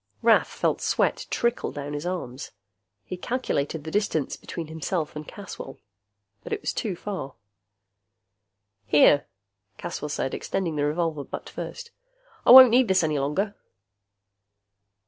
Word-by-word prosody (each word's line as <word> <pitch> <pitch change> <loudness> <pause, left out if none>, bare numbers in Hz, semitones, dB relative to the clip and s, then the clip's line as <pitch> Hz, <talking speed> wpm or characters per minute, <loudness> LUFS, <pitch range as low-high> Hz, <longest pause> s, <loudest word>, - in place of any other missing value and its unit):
Rath - - +5
felt - - -1
sweat - - 0
trickle 235 0 0
down 145 0 -6
his 145 +4 -4
arms. 145 -8 -5 0.5
He 185 - -6
calculated 160 - -2
the 160 - -6
distance 205 -8 0
between 170 - -7
himself 160 0 -3
and 150 0 -7
Caswell. 195 -9 -9 1.0
Too 205 -6 -2
far. 180 -8 -6 1.5
"Here," 145 +1 +5 0.5
Caswell 150 - -5
said, 135 -2 -2
extending 170 -5 -2
the 145 -1 0
revolver 155 -1 -1
butt - - -8
first. 475 -1 -7 0.6
"I - - +5
won't 255 -1 +11
need 250 +1 +4
this 190 -2 +3
any 155 -2 0
longer." 190 +10 -1
160 Hz, 125 wpm, -25 LUFS, 145-200 Hz, 1.5 s, won't